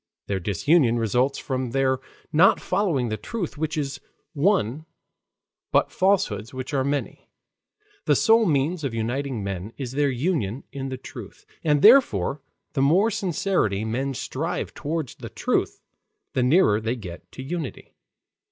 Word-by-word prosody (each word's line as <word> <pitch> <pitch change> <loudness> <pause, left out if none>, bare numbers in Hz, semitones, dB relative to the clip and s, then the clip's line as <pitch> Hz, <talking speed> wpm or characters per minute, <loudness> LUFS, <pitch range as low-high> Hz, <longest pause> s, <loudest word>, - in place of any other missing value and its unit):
Their 100 -1 -2
disunion 115 - +2
results 125 +5 +1
from 130 -2 -3
their 130 -1 +2 0.3
not 170 +5 +6
following 175 - 0
the 110 - -2
truth 210 - -4
which 155 +1 -2
is 140 -2 -3 0.3
one, 155 - +1 0.8
but - - +3
falsehoods 185 - +1
which 130 +2 -5
are 135 -2 +2
many. 140 +1 -3 0.8
The - - +4
sole 225 -1 +4
means 155 +3 +1
of 130 -5 -2
uniting 120 +1 -2
men 100 +2 -5
is 130 -4 -4
their 145 +1 +1
union 130 - -1
in 135 -1 -5
the 130 - -4
truth. 125 -5 -11 0.2
And 150 -3 +2
therefore 150 - +5 0.3
the 135 - 0
more 180 +11 +4
sincerely 175 - 0
men 130 +5 -2
strive 165 +9 -3
toward 155 -2 -3
the - - -7
truth, - - -1 0.5
the 130 - +1
nearer 125 - +4
they 115 +3 -1
get 90 -8 -10
to 130 - -7
unity. 160 -1 -5
135 Hz, 145 wpm, -24 LUFS, 120-165 Hz, 0.8 s, not